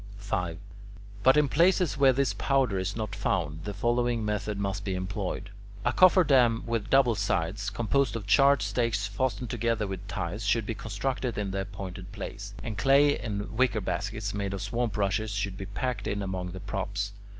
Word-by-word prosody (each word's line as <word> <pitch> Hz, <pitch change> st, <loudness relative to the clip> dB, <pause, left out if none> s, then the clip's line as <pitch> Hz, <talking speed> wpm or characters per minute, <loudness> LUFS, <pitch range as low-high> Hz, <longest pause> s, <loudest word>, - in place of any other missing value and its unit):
5. 90 Hz, -4 st, -2 dB, 0.6 s
But 130 Hz, +6 st, +5 dB
in 150 Hz, -1 st, +4 dB
places 175 Hz, +3 st, +3 dB
where 135 Hz, -1 st, +5 dB
this 135 Hz, +1 st, +1 dB
powder 130 Hz, -8 st, +1 dB
is 95 Hz, +2 st, -2 dB
not 110 Hz, -2 st, -4 dB
found, 80 Hz, -5 st, -1 dB
the 105 Hz, -, -3 dB
following 120 Hz, -1 st, +1 dB
method 105 Hz, 0 st, -2 dB
must 100 Hz, 0 st, -2 dB
be 95 Hz, -2 st, -2 dB
employed. 95 Hz, +1 st, -4 dB, 0.3 s
A -, -, +2 dB
cofferdam 135 Hz, -11 st, +5 dB
with 115 Hz, -2 st, -2 dB
double 135 Hz, -3 st, +5 dB
sides, 100 Hz, 0 st, -1 dB
composed 120 Hz, +3 st, 0 dB
of 110 Hz, -3 st, -4 dB
charred 140 Hz, +8 st, +5 dB
stakes 115 Hz, -4 st, 0 dB
fastened 115 Hz, +3 st, -2 dB
together 115 Hz, -2 st, 0 dB
with 95 Hz, 0 st, -6 dB
ties, 95 Hz, +2 st, -4 dB
should 105 Hz, +2 st, +1 dB
be 115 Hz, -, -2 dB
constructed 115 Hz, +4 st, -3 dB
in 100 Hz, -2 st, -2 dB
the 95 Hz, 0 st, -1 dB
appointed 95 Hz, -1 st, -7 dB
place, 100 Hz, 0 st, -7 dB
and 110 Hz, -3 st, -4 dB
clay 140 Hz, +4 st, +4 dB
in 105 Hz, -1 st, -4 dB
wicker 120 Hz, -2 st, +2 dB
baskets 100 Hz, +2 st, -3 dB
made 100 Hz, -1 st, -2 dB
of 95 Hz, -, -5 dB
swamp 120 Hz, -2 st, -2 dB
rushes 105 Hz, +2 st, 0 dB
should 100 Hz, -2 st, -2 dB
be 95 Hz, -, -7 dB
packed 115 Hz, +6 st, -3 dB
in 100 Hz, 0 st, -2 dB
among 95 Hz, -1 st, -3 dB
the 95 Hz, -, -6 dB
props. 100 Hz, +1 st, -3 dB
105 Hz, 180 wpm, -28 LUFS, 100-120 Hz, 0.6 s, But